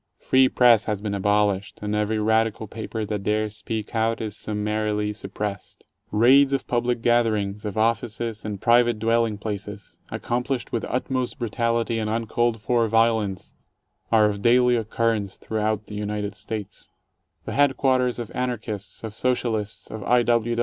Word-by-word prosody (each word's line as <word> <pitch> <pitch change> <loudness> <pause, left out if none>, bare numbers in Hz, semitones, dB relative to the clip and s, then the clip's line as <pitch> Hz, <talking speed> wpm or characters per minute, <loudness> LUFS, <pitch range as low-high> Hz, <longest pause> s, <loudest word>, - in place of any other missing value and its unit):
Free 130 0 +3
press 120 -3 +5
has 105 -2 -1
been 105 0 -3
abolished, 100 0 +1
and 105 0 -2
every 105 +1 0
radical 110 0 +1
paper 110 +1 -5
that 105 -1 -3
dares 105 +1 -1
speak 110 0 -5
out, 115 0 +1
is 110 -3 -4
summarily 105 0 -2
suppressed. 100 -1 -6 0.2
Raids 135 +6 +5
of 135 - -1
public 120 -1 -1
gatherings, 110 -4 +1
of 105 0 -4
offices, 115 0 -1
and 105 -2 -4
private 120 +1 +4
dwelling 115 -1 +1
places, 105 0 -6
accomplished 125 +1 -2
with 115 - -2
utmost 130 0 -2
brutality 115 0 0
and 110 -1 -2
uncalled 115 +1 0
for 115 +1 +2
violence, 110 -4 +1 0.6
are 110 -2 +5
of 100 -1 -1
daily 125 +2 +4
occurrence 110 -3 -1
through 110 - -4
out 110 0 0
the - - -10
United 105 0 -3
States. 105 -3 -7 0.5
The - - -4
headquarters 130 -3 +2
of 120 -3 -6
Anarchists, 110 -6 -4
of 110 -2 -5
Socialists, 110 -4 -1
of 110 -2 -6
I. 125 0 +4
110 Hz, 150 wpm, -24 LUFS, 105-120 Hz, 0.6 s, press